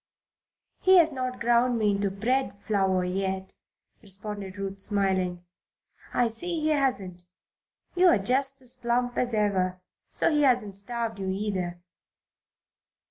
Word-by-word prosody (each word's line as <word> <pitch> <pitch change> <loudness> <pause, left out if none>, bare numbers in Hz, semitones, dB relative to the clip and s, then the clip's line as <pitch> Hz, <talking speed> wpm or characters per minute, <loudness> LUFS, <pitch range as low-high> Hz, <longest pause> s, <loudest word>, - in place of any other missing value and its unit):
"He 375 0 +6
has 330 -2 +6
not 255 -2 -4
ground 240 +1 +3
me 210 -2 +2
into 200 0 0
bread 220 +2 -1
flour 190 -3 +1
yet," 190 +1 -3 0.5
responded 200 -1 -6
Ruth, 195 0 -4
smiling. 190 -3 0 0.7
"I 245 - +2
see 335 +9 -4
he 310 0 0
hasn't. 200 - -1 0.7
You're 360 -8 +5
just 265 +6 0
as 250 -1 -2
plump 245 0 -1
as 245 -2 0
ever, 185 -3 +1 0.3
so - - +2
he 300 -1 +2
hasn't 245 -8 +2
starved 230 +1 -3
you, 190 -1 -3
either. 190 -3 -3
210 Hz, 130 wpm, -27 LUFS, 195-250 Hz, 0.7 s, He